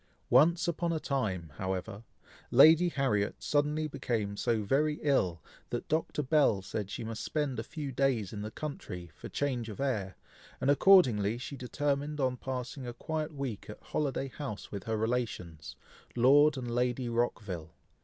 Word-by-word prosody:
Once 170 Hz, +7 st, +5 dB
upon 170 Hz, 0 st, 0 dB
a 160 Hz, -, 0 dB
time, 95 Hz, -, -2 dB
however, 95 Hz, +3 st, -4 dB, 0.5 s
Lady 160 Hz, +7 st, +7 dB
Harriet 130 Hz, -10 st, 0 dB
suddenly 150 Hz, +1 st, 0 dB
became 110 Hz, -8 st, -2 dB
so 115 Hz, 0 st, 0 dB
very 150 Hz, +8 st, +1 dB
ill, 95 Hz, -, +1 dB, 0.3 s
that -, -, -4 dB
Dr. 155 Hz, -1 st, -1 dB
Bell 130 Hz, -9 st, +3 dB
said 100 Hz, 0 st, -4 dB
she -, -, -5 dB
must 110 Hz, -1 st, -5 dB
spend 145 Hz, -6 st, -1 dB
a -, -, -2 dB
few 150 Hz, +1 st, -6 dB
days 125 Hz, -7 st, 0 dB
in 105 Hz, -, -5 dB
the 105 Hz, -, -4 dB
country, 90 Hz, -, -7 dB
for -, -, -9 dB
change 125 Hz, -5 st, -2 dB
of 105 Hz, -, -8 dB
air, 110 Hz, -9 st, -1 dB, 0.4 s
and 140 Hz, -, +3 dB
accordingly 125 Hz, -, +5 dB
she 125 Hz, +3 st, -6 dB
determined 145 Hz, +3 st, -2 dB
on 130 Hz, -2 st, +1 dB
passing 130 Hz, +1 st, -5 dB
a 120 Hz, -, -5 dB
quiet 155 Hz, +5 st, -3 dB
week 135 Hz, -9 st, -5 dB
at 105 Hz, -, -8 dB
Holiday 135 Hz, -2 st, -2 dB
House 130 Hz, -6 st, -7 dB
with 100 Hz, -2 st, -6 dB
her 110 Hz, -1 st, -1 dB
relations, 110 Hz, -9 st, -3 dB, 0.4 s
Lord 140 Hz, +4 st, +5 dB
and 120 Hz, -2 st, -4 dB
Lady 125 Hz, +1 st, 0 dB
Rockville. 105 Hz, -9 st, -2 dB
125 Hz, 160 wpm, -31 LUFS, 105-145 Hz, 0.5 s, Lady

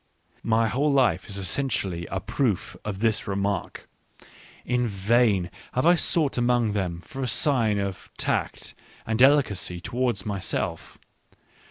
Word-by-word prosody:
My 115 Hz, 0 st, +2 dB
whole 140 Hz, +6 st, +1 dB
life 135 Hz, -5 st, +2 dB
is 100 Hz, -, -4 dB
essenti 100 Hz, +7 st, -1 dB
ally 85 Hz, -2 st, -4 dB
a 95 Hz, -, -2 dB
proof 95 Hz, -, -1 dB
of 100 Hz, -2 st, -5 dB
this 110 Hz, -2 st, +1 dB
remark. 100 Hz, -1 st, -2 dB, 0.8 s
In 125 Hz, 0 st, +1 dB
vain 100 Hz, -2 st, +2 dB, 0.2 s
have 130 Hz, -, 0 dB
I 175 Hz, -, +7 dB
sought 160 Hz, -6 st, +1 dB
among 120 Hz, -2 st, +2 dB
them 90 Hz, -4 st, -2 dB
for 135 Hz, +8 st, -8 dB
a 130 Hz, -, -1 dB
sign 115 Hz, -4 st, +2 dB
of 100 Hz, -2 st, -4 dB
tact -, -, -2 dB, 0.3 s
and 110 Hz, +1 st, -1 dB
delicacy 130 Hz, -10 st, +3 dB
towards 120 Hz, 0 st, -2 dB
myself. 100 Hz, -3 st, -3 dB
110 Hz, 140 wpm, -25 LUFS, 95-125 Hz, 0.8 s, I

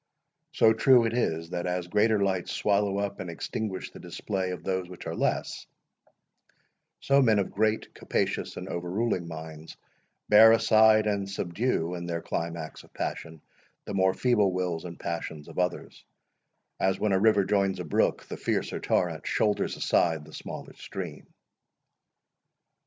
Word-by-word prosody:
So 110 Hz, 0 st, +5 dB
true 120 Hz, +1 st, +5 dB
it 115 Hz, -, -1 dB
is, 85 Hz, -8 st, -1 dB
that 90 Hz, 0 st, -3 dB
as 90 Hz, 0 st, -2 dB
greater 105 Hz, +3 st, +2 dB
lights 95 Hz, -2 st, -1 dB
swallow 100 Hz, -1 st, +1 dB
up 100 Hz, 0 st, -3 dB
and 95 Hz, -2 st, -5 dB
extinguish 95 Hz, +3 st, -4 dB
the -, -, -12 dB
display 95 Hz, -2 st, -3 dB
of 90 Hz, -, -6 dB
those 95 Hz, -2 st, -2 dB
which 90 Hz, -, -10 dB
are -, -, -3 dB
less, -, -, -2 dB, 1.3 s
so 140 Hz, 0 st, +4 dB
men 110 Hz, -5 st, +4 dB
of 100 Hz, -, 0 dB
great, 110 Hz, +2 st, 0 dB
capacious, -, -, -2 dB
and -, -, -6 dB
overruling 90 Hz, +1 st, -2 dB
minds, 80 Hz, -1 st, -9 dB, 0.5 s
bear 110 Hz, +2 st, +8 dB
aside 110 Hz, -1 st, +5 dB
and 100 Hz, -2 st, -1 dB
subdue, 90 Hz, -1 st, -1 dB
in 85 Hz, -1 st, -5 dB
their 85 Hz, -1 st, -3 dB
climax 85 Hz, -2 st, -4 dB
of -, -, -20 dB
passion, 80 Hz, -2 st, -5 dB, 0.4 s
the -, -, -5 dB
more 95 Hz, -1 st, +2 dB
feeble 110 Hz, -6 st, +2 dB
wills 90 Hz, -2 st, -2 dB
and 85 Hz, -1 st, -8 dB
passions 80 Hz, -3 st, -5 dB
of -, -, -6 dB
others; 90 Hz, 0 st, -3 dB, 0.8 s
as, 95 Hz, 0 st, +1 dB
when 105 Hz, -, +1 dB
a 95 Hz, -, +3 dB
river 105 Hz, -1 st, +4 dB
joins 100 Hz, -1 st, +1 dB
a -, -, -3 dB
brook, 75 Hz, -, +1 dB
the -, -, -7 dB
fiercer -, -, -2 dB
torrent 85 Hz, -3 st, -1 dB
shoulders 105 Hz, -1 st, 0 dB
aside 80 Hz, -3 st, +1 dB
the 80 Hz, -, -15 dB
smaller -, -, -8 dB
stream. 90 Hz, -6 st, -8 dB
95 Hz, 155 wpm, -27 LUFS, 85-105 Hz, 1.3 s, bear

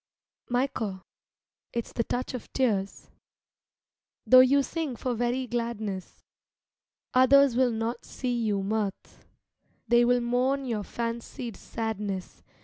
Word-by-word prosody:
Michael, 235 Hz, -6 st, -1 dB, 0.7 s
it's 235 Hz, -1 st, -3 dB
the 230 Hz, -, 0 dB
touch 245 Hz, +3 st, -3 dB
of 250 Hz, -, -7 dB
tears. 205 Hz, -7 st, -1 dB, 1.1 s
Though 255 Hz, -, +8 dB
you 275 Hz, +2 st, +6 dB
sing 310 Hz, -3 st, -3 dB
for 250 Hz, +2 st, -2 dB
very 245 Hz, +2 st, -1 dB
gladness, 230 Hz, -6 st, -4 dB, 0.9 s
Others 260 Hz, 0 st, +6 dB
will 255 Hz, 0 st, +4 dB
not 230 Hz, +1 st, -3 dB
see 250 Hz, -2 st, -3 dB
you 210 Hz, -4 st, 0 dB
mirth; 205 Hz, -1 st, 0 dB
Vigils -, -, -24 dB, 0.7 s
They 240 Hz, 0 st, +5 dB
will 245 Hz, 0 st, +3 dB
mourn 255 Hz, +3 st, +1 dB
your 225 Hz, -4 st, -2 dB
fancied 230 Hz, +1 st, -5 dB
sadness. 210 Hz, -4 st, -4 dB
240 Hz, 120 wpm, -28 LUFS, 220-255 Hz, 1.1 s, Though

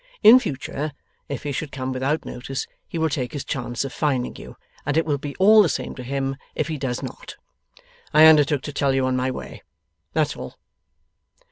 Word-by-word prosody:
In 235 Hz, +4 st, +10 dB
future, 150 Hz, -, -4 dB, 0.4 s
if 140 Hz, -, -4 dB
he 145 Hz, -, -2 dB
should 140 Hz, +1 st, -4 dB
come 130 Hz, -1 st, -4 dB
without 135 Hz, +5 st, -1 dB
notice, 135 Hz, +2 st, -5 dB, 0.2 s
he -, -, -5 dB
will 160 Hz, 0 st, +2 dB
take 130 Hz, -5 st, -3 dB
his 145 Hz, -, -4 dB
chance 120 Hz, -2 st, -3 dB
of 135 Hz, -, -6 dB
finding 140 Hz, -5 st, -1 dB
you, -, -, -11 dB, 0.3 s
and 145 Hz, +2 st, -1 dB
it 160 Hz, -, +3 dB
will 145 Hz, -3 st, 0 dB
be 145 Hz, 0 st, -6 dB
all 215 Hz, +3 st, +7 dB
the 185 Hz, -, +3 dB
same -, -, -3 dB
to -, -, -8 dB
him 135 Hz, +1 st, -2 dB, 0.2 s
if 155 Hz, +1 st, -1 dB
he 155 Hz, -, -2 dB
does 125 Hz, -2 st, -3 dB
not. -, -, -8 dB, 0.8 s
I 155 Hz, +1 st, +7 dB
undertook 150 Hz, -3 st, +5 dB
to 145 Hz, -, -6 dB
tell 140 Hz, -1 st, +1 dB
you 135 Hz, -1 st, +2 dB
on 130 Hz, 0 st, +1 dB
my 130 Hz, +1 st, 0 dB
way. 130 Hz, -, -7 dB, 0.5 s
That's -, -, +1 dB
all. -, -, -8 dB
140 Hz, 205 wpm, -23 LUFS, 130-155 Hz, 0.8 s, In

